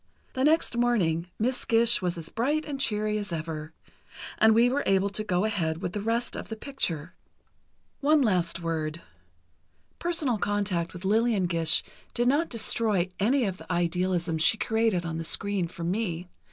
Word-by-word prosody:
The 260 Hz, -, -1 dB
next 310 Hz, -3 st, +3 dB
morning 185 Hz, -9 st, +1 dB
Miss 250 Hz, +4 st, 0 dB
Gish 230 Hz, 0 st, +4 dB
was 175 Hz, -1 st, -1 dB
as 165 Hz, -1 st, -6 dB
bright 290 Hz, +7 st, -1 dB
and 280 Hz, -3 st, -5 dB
cheery 215 Hz, -3 st, 0 dB
as 205 Hz, -3 st, -5 dB
ever, 155 Hz, -1 st, -5 dB, 0.7 s
and 220 Hz, 0 st, +6 dB
we 235 Hz, +2 st, +5 dB
were 270 Hz, +3 st, 0 dB
able 195 Hz, +1 st, +3 dB
to 210 Hz, +2 st, -3 dB
go 185 Hz, -1 st, 0 dB
ahead 165 Hz, -7 st, -1 dB
with 180 Hz, -1 st, -3 dB
the 210 Hz, -, -3 dB
rest 230 Hz, +3 st, -1 dB
of -, -, -7 dB
the 225 Hz, -, -4 dB
picture. 185 Hz, -, -3 dB, 0.9 s
One 295 Hz, 0 st, +4 dB
last 175 Hz, -6 st, 0 dB
word: 160 Hz, -1 st, -3 dB, 1.0 s
personal 320 Hz, -, +1 dB
contact 195 Hz, -5 st, -1 dB
with 180 Hz, +1 st, -8 dB
Lillian 215 Hz, -1 st, +2 dB
Gish 165 Hz, -2 st, +2 dB, 0.3 s
did 240 Hz, +1 st, +1 dB
not 295 Hz, +6 st, +2 dB
destroy 220 Hz, -5 st, +1 dB
any 245 Hz, +5 st, +2 dB
of 190 Hz, -2 st, -3 dB
the -, -, -9 dB
idealism 175 Hz, -1 st, 0 dB
she 180 Hz, +7 st, +4 dB
created 220 Hz, -6 st, 0 dB
on 165 Hz, -1 st, -3 dB
the -, -, -3 dB
screen 195 Hz, +2 st, 0 dB
for 170 Hz, 0 st, -8 dB
me. 180 Hz, -1 st, -2 dB
200 Hz, 170 wpm, -27 LUFS, 170-235 Hz, 1.0 s, and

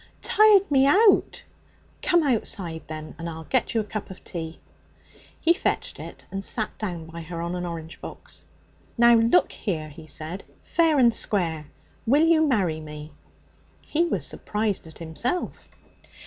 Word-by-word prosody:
'H'm?' -, -, -24 dB, 0.2 s
'Tired 415 Hz, -4 st, +5 dB
me 270 Hz, -1 st, +5 dB
out.' 405 Hz, +7 st, +4 dB, 0.6 s
'Come 345 Hz, -2 st, +3 dB
outside, 200 Hz, -, -1 dB
then, 155 Hz, 0 st, -7 dB
and 170 Hz, 0 st, -4 dB
I'll 160 Hz, 0 st, -7 dB
get 250 Hz, +7 st, 0 dB
you 225 Hz, -, +3 dB
a -, -, -4 dB
cup 210 Hz, 0 st, -6 dB
of 190 Hz, -, -11 dB
tea.' 165 Hz, -2 st, -6 dB, 0.8 s
He 335 Hz, -, +4 dB
fetched 350 Hz, -, -2 dB
it -, -, -10 dB
and 195 Hz, 0 st, -4 dB
sat 215 Hz, +2 st, -2 dB
down 175 Hz, -6 st, -4 dB
by 165 Hz, +1 st, -8 dB
her 165 Hz, +1 st, -6 dB
on 170 Hz, +1 st, -3 dB
an 180 Hz, 0 st, -3 dB
orange 165 Hz, -1 st, -7 dB
box. -, -, -8 dB, 0.5 s
'Now 235 Hz, 0 st, +7 dB
look 230 Hz, -5 st, +4 dB
here,' 160 Hz, -7 st, -3 dB
he 155 Hz, +1 st, -12 dB
said, 160 Hz, +5 st, -6 dB, 0.2 s
'fair 325 Hz, -3 st, +2 dB
and 240 Hz, -3 st, +5 dB
square, 165 Hz, -9 st, -1 dB, 0.4 s
will 290 Hz, +7 st, +5 dB
you 320 Hz, -1 st, +4 dB
marry 185 Hz, -, +1 dB
me?' 150 Hz, -1 st, -9 dB, 0.7 s
He 330 Hz, +3 st, 0 dB
was 340 Hz, -, -1 dB
surprised 210 Hz, -5 st, -2 dB
at 160 Hz, -, -13 dB
himself. 170 Hz, -, -3 dB
195 Hz, 160 wpm, -25 LUFS, 160-265 Hz, 0.8 s, Now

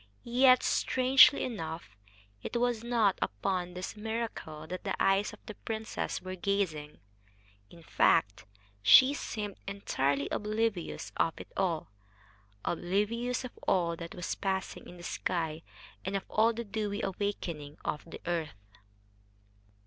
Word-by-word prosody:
Yet, 255 Hz, +1 st, +5 dB
strangely 260 Hz, +2 st, +5 dB
enough, 165 Hz, -, -5 dB, 0.5 s
it -, -, -3 dB
was 240 Hz, -2 st, +1 dB
not 230 Hz, -5 st, +2 dB
upon 180 Hz, -, -2 dB
this 180 Hz, +4 st, -5 dB
miracle 215 Hz, -8 st, -4 dB
that 180 Hz, +3 st, -6 dB
the 195 Hz, -, -1 dB
eyes 195 Hz, +2 st, +3 dB
of -, -, -12 dB
the 215 Hz, -, -7 dB
princess 220 Hz, +1 st, -4 dB
were 185 Hz, 0 st, -5 dB
gazing. 180 Hz, -6 st, -1 dB, 0.7 s
In 170 Hz, +6 st, -15 dB
fact, 100 Hz, -, +2 dB, 0.4 s
she 255 Hz, -, +8 dB
seemed 210 Hz, -7 st, -4 dB
entirely 140 Hz, -8 st, 0 dB
oblivious 215 Hz, -3 st, -1 dB
of 165 Hz, -, +2 dB
it -, -, -10 dB
all 170 Hz, -, -1 dB, 0.7 s
oblivious 210 Hz, +9 st, 0 dB
of 255 Hz, -, -6 dB, 0.2 s
all 170 Hz, -2 st, +2 dB
that 170 Hz, 0 st, -8 dB
was 180 Hz, -, -3 dB
passing 190 Hz, -1 st, -3 dB
in 180 Hz, -, -11 dB
the 175 Hz, -, -11 dB
sky, 165 Hz, -3 st, -2 dB, 0.4 s
and 190 Hz, +1 st, -2 dB
of 195 Hz, -, -1 dB
all 225 Hz, +2 st, +4 dB
the 235 Hz, +1 st, -4 dB
dewy 210 Hz, -1 st, -3 dB
awakening 175 Hz, -7 st, -3 dB
of 150 Hz, -, -2 dB
the -, -, -9 dB
earth. 155 Hz, -13 st, -3 dB
195 Hz, 135 wpm, -31 LUFS, 165-220 Hz, 0.7 s, she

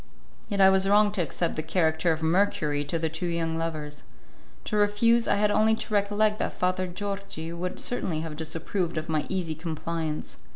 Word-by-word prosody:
Yet 200 Hz, -2 st, -2 dB
I 190 Hz, 0 st, +8 dB
was 190 Hz, 0 st, +3 dB
wrong 205 Hz, 0 st, +5 dB
to 200 Hz, -3 st, -1 dB
accept 170 Hz, +2 st, -2 dB
the 155 Hz, -, -1 dB
character 160 Hz, 0 st, +1 dB
of 160 Hz, 0 st, -2 dB
Mercury 160 Hz, -4 st, +1 dB
to 165 Hz, -, -1 dB
the 160 Hz, 0 st, 0 dB
two 160 Hz, +3 st, -3 dB
young 165 Hz, -1 st, -1 dB
lovers. 150 Hz, -3 st, -4 dB, 0.6 s
To 215 Hz, -, -3 dB
refuse, 210 Hz, +3 st, +3 dB
I -, -, +3 dB
had 205 Hz, +1 st, +2 dB
only 215 Hz, +1 st, +4 dB
to 225 Hz, -, -6 dB
recollect 210 Hz, +1 st, +2 dB
that -, -, -1 dB
Father 185 Hz, 0 st, 0 dB
Georgi 195 Hz, -3 st, -5 dB
would 180 Hz, +2 st, -4 dB
certainly 175 Hz, -10 st, -2 dB
have 160 Hz, -2 st, -5 dB
disapproved 165 Hz, +2 st, -3 dB
of 155 Hz, +1 st, -3 dB
my 155 Hz, -2 st, 0 dB
easy 180 Hz, -4 st, -1 dB
compliance. 160 Hz, -1 st, -4 dB
175 Hz, 190 wpm, -27 LUFS, 160-205 Hz, 0.6 s, I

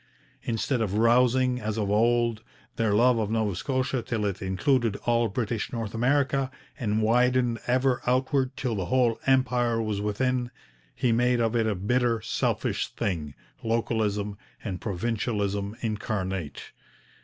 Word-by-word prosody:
Instead 120 Hz, +2 st, -1 dB
of 105 Hz, -3 st, -1 dB
rousing, 125 Hz, +2 st, +3 dB
as 110 Hz, 0 st, -3 dB
of 100 Hz, -2 st, -1 dB
old, 115 Hz, +1 st, +2 dB, 0.3 s
their 115 Hz, -2 st, +1 dB
love 120 Hz, +3 st, +4 dB
of 105 Hz, -2 st, -1 dB
Nova 110 Hz, -4 st, 0 dB
Scotia 130 Hz, +3 st, -1 dB
till 115 Hz, -2 st, -2 dB
it 100 Hz, -2 st, -2 dB
included 110 Hz, +4 st, +1 dB
all 120 Hz, -1 st, +3 dB
British 110 Hz, 0 st, -2 dB
North 115 Hz, -3 st, -4 dB
America 135 Hz, +2 st, +1 dB, 0.3 s
and 110 Hz, -3 st, 0 dB
widened 125 Hz, +1 st, +2 dB
ever 130 Hz, +1 st, +2 dB
outward 130 Hz, +1 st, +1 dB
till 125 Hz, -3 st, -1 dB
the 95 Hz, -4 st, -2 dB
whole 125 Hz, -3 st, +2 dB
Empire 125 Hz, -3 st, +2 dB
was 105 Hz, -3 st, -2 dB
within, 125 Hz, +4 st, 0 dB, 0.5 s
he 125 Hz, -, +1 dB
made 120 Hz, +1 st, +2 dB
of 115 Hz, 0 st, +1 dB
it 115 Hz, -1 st, +2 dB
a 105 Hz, -, 0 dB
bitter, 115 Hz, +4 st, +1 dB
selfish -, -, -1 dB
thing, 75 Hz, -7 st, -3 dB, 0.3 s
localism 105 Hz, -3 st, -1 dB, 0.2 s
and 95 Hz, -4 st, -4 dB
provincialism 105 Hz, 0 st, -2 dB
incarnate. 95 Hz, -, -3 dB
115 Hz, 140 wpm, -27 LUFS, 105-125 Hz, 0.5 s, love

